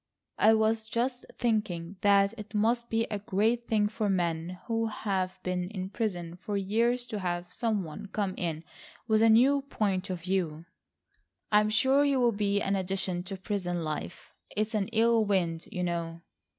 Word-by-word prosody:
I 220 Hz, +1 st, +6 dB
was 220 Hz, 0 st, +1 dB
just 245 Hz, +2 st, -1 dB
thinking 200 Hz, -7 st, -1 dB
that 200 Hz, 0 st, +4 dB
it 215 Hz, -1 st, -9 dB
must 235 Hz, +3 st, +1 dB
be 225 Hz, 0 st, +1 dB
a 210 Hz, -, -1 dB
great 220 Hz, +3 st, +1 dB
thing 210 Hz, -2 st, +2 dB
for 210 Hz, 0 st, -2 dB
men 175 Hz, -1 st, -1 dB
who 225 Hz, -1 st, 0 dB
have 190 Hz, -4 st, -2 dB
been 180 Hz, -1 st, -2 dB
in 190 Hz, -2 st, -5 dB
prison 180 Hz, -7 st, -3 dB
for 200 Hz, +2 st, -3 dB
years 230 Hz, +5 st, +1 dB
to 220 Hz, -4 st, -4 dB
have 175 Hz, -1 st, -3 dB
some 220 Hz, -5 st, 0 dB
one 175 Hz, +6 st, -8 dB
come 200 Hz, -1 st, -2 dB
in 165 Hz, -2 st, -3 dB, 0.4 s
with 220 Hz, -1 st, +3 dB
a 225 Hz, -, +6 dB
new 265 Hz, +6 st, +5 dB
point 200 Hz, -9 st, -1 dB
of 180 Hz, -2 st, -3 dB
view." 170 Hz, -3 st, -2 dB, 0.9 s
"I'm 210 Hz, 0 st, +4 dB
sure 265 Hz, +6 st, +4 dB
you 280 Hz, -2 st, +2 dB
will 240 Hz, -1 st, +4 dB
be 205 Hz, -1 st, 0 dB
an 195 Hz, -, +1 dB
addition 190 Hz, -1 st, -2 dB
to 195 Hz, +1 st, -5 dB
prison 180 Hz, -3 st, -2 dB
life. 150 Hz, -, -5 dB, 0.2 s
It's 215 Hz, +2 st, 0 dB
an 205 Hz, -3 st, 0 dB
ill 230 Hz, 0 st, +3 dB
wind, 175 Hz, -5 st, 0 dB
you 180 Hz, -, -2 dB
know." 170 Hz, -1 st, -3 dB
205 Hz, 175 wpm, -29 LUFS, 180-225 Hz, 0.9 s, I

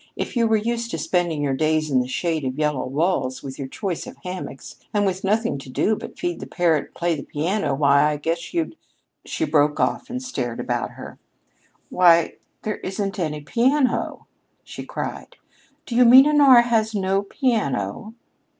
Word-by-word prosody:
If -, -, -4 dB
you 230 Hz, -1 st, +3 dB
were 220 Hz, 0 st, +3 dB
used 235 Hz, +2 st, -2 dB
to -, -, -3 dB
spending 170 Hz, -5 st, -1 dB
your 140 Hz, -2 st, 0 dB
days 155 Hz, +1 st, 0 dB
in 130 Hz, -, +4 dB
the 125 Hz, -, -1 dB
shade 160 Hz, +3 st, -2 dB
of 130 Hz, +1 st, -3 dB
yellow 150 Hz, -4 st, 0 dB
walls, 140 Hz, -2 st, -1 dB
with 135 Hz, 0 st, -8 dB
your 135 Hz, -, -4 dB
choice 180 Hz, +5 st, -4 dB
of -, -, -10 dB
hammocks, 180 Hz, -6 st, -7 dB, 0.2 s
and 205 Hz, 0 st, +3 dB
with 190 Hz, -1 st, -2 dB
nothing 215 Hz, -4 st, 0 dB
to 135 Hz, -, -11 dB
do 215 Hz, +11 st, +1 dB
but -, -, -9 dB
feed 350 Hz, 0 st, -3 dB
the -, -, -7 dB
parrot 165 Hz, -5 st, +1 dB
and -, -, -26 dB
play 175 Hz, 0 st, 0 dB
the 145 Hz, -, -6 dB
piano, 155 Hz, 0 st, -1 dB
why, 140 Hz, +1 st, +4 dB
I 150 Hz, -, -2 dB
guess 165 Hz, +3 st, -3 dB
you'd 330 Hz, -2 st, -2 dB, 0.3 s
" -, -, -44 dB
She 320 Hz, -, -1 dB
broke 150 Hz, -, +2 dB
off 265 Hz, -, 0 dB
and 250 Hz, +1 st, -3 dB
stared 130 Hz, -, -4 dB
about -, -, -2 dB
her. -, -, -10 dB, 0.7 s
"Why, 170 Hz, -2 st, +4 dB, 0.3 s
there 215 Hz, -1 st, -2 dB
isn't 195 Hz, +1 st, -4 dB
any 150 Hz, -3 st, -2 dB
piano!" 255 Hz, -, 0 dB, 0.4 s
she -, -, -9 dB
cried. -, -, -6 dB, 0.5 s
"Do 235 Hz, -, -5 dB
you 250 Hz, -, +6 dB
mean 260 Hz, +3 st, +9 dB
Honora 285 Hz, -5 st, +6 dB
has 225 Hz, -2 st, 0 dB
no 195 Hz, 0 st, +1 dB
piano?" 205 Hz, -, -2 dB
180 Hz, 185 wpm, -22 LUFS, 145-230 Hz, 0.7 s, mean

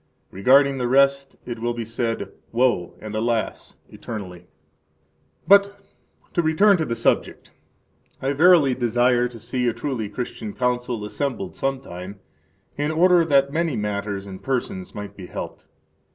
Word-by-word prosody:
Regarding 135 Hz, +7 st, +4 dB
the 125 Hz, -, 0 dB
rest 140 Hz, +1 st, +3 dB
it 120 Hz, -2 st, -6 dB
will 120 Hz, +1 st, -2 dB
be 115 Hz, -1 st, -4 dB
said, 115 Hz, 0 st, -3 dB, 0.2 s
Woe, 120 Hz, -7 st, +1 dB
and, 110 Hz, 0 st, -8 dB
alas! 115 Hz, +1 st, -2 dB
eternally. 95 Hz, -6 st, -8 dB
10 90 Hz, -, -25 dB, 1.0 s
But 200 Hz, +1 st, +5 dB, 0.5 s
to 175 Hz, -, +2 dB
return 190 Hz, +5 st, +4 dB
to 160 Hz, -, -1 dB
the 115 Hz, -, -2 dB
subject. -, -, -1 dB, 0.7 s
I 135 Hz, +1 st, -1 dB
verily 155 Hz, -3 st, +5 dB
desire 120 Hz, 0 st, +2 dB
to 120 Hz, -1 st, -11 dB
see 125 Hz, +2 st, -2 dB
a 120 Hz, -, +1 dB
truly 120 Hz, -7 st, -3 dB
Christian 110 Hz, -2 st, -5 dB
Council 125 Hz, -3 st, -1 dB
[assembled 105 Hz, -2 st, -4 dB
some 135 Hz, -1 st, -2 dB
time], 95 Hz, -3 st, -9 dB, 0.6 s
in 145 Hz, +1 st, 0 dB
order 175 Hz, +2 st, +4 dB
that 140 Hz, -2 st, +3 dB
many 165 Hz, -3 st, 0 dB
matters 100 Hz, -1 st, -3 dB
and 95 Hz, -1 st, -9 dB
persons 120 Hz, -8 st, -3 dB
might 105 Hz, -1 st, -7 dB
be 95 Hz, -3 st, -9 dB
helped. -, -, -7 dB
125 Hz, 150 wpm, -23 LUFS, 105-140 Hz, 1.0 s, But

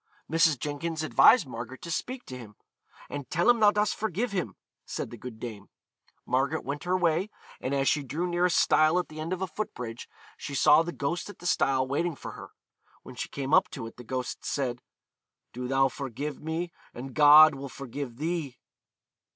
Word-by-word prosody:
Mrs. 160 Hz, -2 st, +3 dB
Jenkins 155 Hz, +4 st, -3 dB
advised 200 Hz, +6 st, +6 dB
Margaret 125 Hz, +1 st, -8 dB
to 170 Hz, -, -5 dB
speak 250 Hz, +8 st, -4 dB
to 130 Hz, -, -8 dB
him; 105 Hz, -4 st, -12 dB, 0.5 s
'and 140 Hz, -3 st, -7 dB
tell 170 Hz, +2 st, +1 dB
him 240 Hz, -1 st, +5 dB
thou 210 Hz, -1 st, +7 dB
dost 210 Hz, 0 st, +1 dB
forgive 220 Hz, +2 st, -2 dB
him,' 185 Hz, -3 st, -3 dB, 0.3 s
said -, -, -5 dB
the -, -, -7 dB
good 115 Hz, -1 st, -9 dB
dame. 110 Hz, -4 st, -8 dB, 0.6 s
Margaret 135 Hz, +5 st, 0 dB
went 145 Hz, +4 st, -4 dB
her 180 Hz, +1 st, +2 dB
way, 175 Hz, +2 st, +1 dB, 0.3 s
and 135 Hz, +2 st, -2 dB
as 135 Hz, 0 st, +1 dB
she 150 Hz, -, +3 dB
drew 150 Hz, +6 st, -3 dB
near 175 Hz, 0 st, +1 dB
a -, -, +3 dB
stile 155 Hz, -1 st, +4 dB
at 180 Hz, -, -1 dB
the 155 Hz, -, -9 dB
end 160 Hz, +3 st, -4 dB
of 185 Hz, 0 st, -2 dB
a -, -, -1 dB
foot 210 Hz, +5 st, -5 dB
bridge, 120 Hz, -1 st, -7 dB, 0.3 s
she 140 Hz, -, -6 dB
saw 150 Hz, +3 st, +6 dB
the 170 Hz, +1 st, -3 dB
ghost 170 Hz, +6 st, -3 dB
at 205 Hz, -, -10 dB
the 175 Hz, -, -13 dB
stile 135 Hz, -7 st, +2 dB
waiting 160 Hz, +4 st, -1 dB
for -, -, -8 dB
her. -, -, -10 dB, 0.5 s
When -, -, -10 dB
she -, -, -5 dB
came 140 Hz, 0 st, -4 dB
up -, -, +5 dB
to 130 Hz, -6 st, -7 dB
it 115 Hz, -, -10 dB
the 125 Hz, -, -10 dB
ghost 125 Hz, +1 st, -4 dB
said, 125 Hz, -3 st, -2 dB, 0.7 s
'Do 125 Hz, +1 st, -4 dB
thou 135 Hz, +1 st, +3 dB
forgive 135 Hz, +2 st, -5 dB
me, 165 Hz, +2 st, -3 dB, 0.2 s
and 130 Hz, +2 st, -7 dB
God 155 Hz, +1 st, +8 dB
will 135 Hz, 0 st, -7 dB
forgive 135 Hz, -2 st, -7 dB
thee. 155 Hz, -4 st, -3 dB
150 Hz, 200 wpm, -28 LUFS, 130-175 Hz, 0.7 s, God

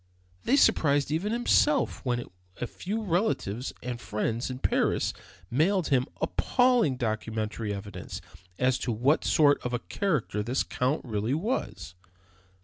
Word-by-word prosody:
They 265 Hz, -, +4 dB
surprised 145 Hz, -, +3 dB
even 175 Hz, +7 st, 0 dB
himself 255 Hz, +5 st, +2 dB
when 120 Hz, -3 st, -1 dB, 0.3 s
a -, -, -1 dB
few 210 Hz, -, -4 dB
relatives 170 Hz, -, -1 dB
and 120 Hz, -1 st, -4 dB
friends 115 Hz, +3 st, -2 dB
in 130 Hz, -, -4 dB
Paris -, -, +1 dB, 0.4 s
mailed 170 Hz, +7 st, +2 dB
him 130 Hz, -3 st, +2 dB
appalling 245 Hz, -, +2 dB
documentary 110 Hz, -2 st, -2 dB
evidence 100 Hz, 0 st, -6 dB, 0.4 s
as 125 Hz, 0 st, +2 dB
to 120 Hz, -, -2 dB
what 125 Hz, +8 st, +2 dB
sort 145 Hz, -2 st, +4 dB
of 125 Hz, -, -3 dB
a 120 Hz, -, 0 dB
character 155 Hz, -, 0 dB
this 120 Hz, +5 st, 0 dB
Count 130 Hz, +5 st, -1 dB
really 110 Hz, +2 st, -1 dB
was. 205 Hz, -, -3 dB
130 Hz, 135 wpm, -28 LUFS, 115-180 Hz, 0.4 s, They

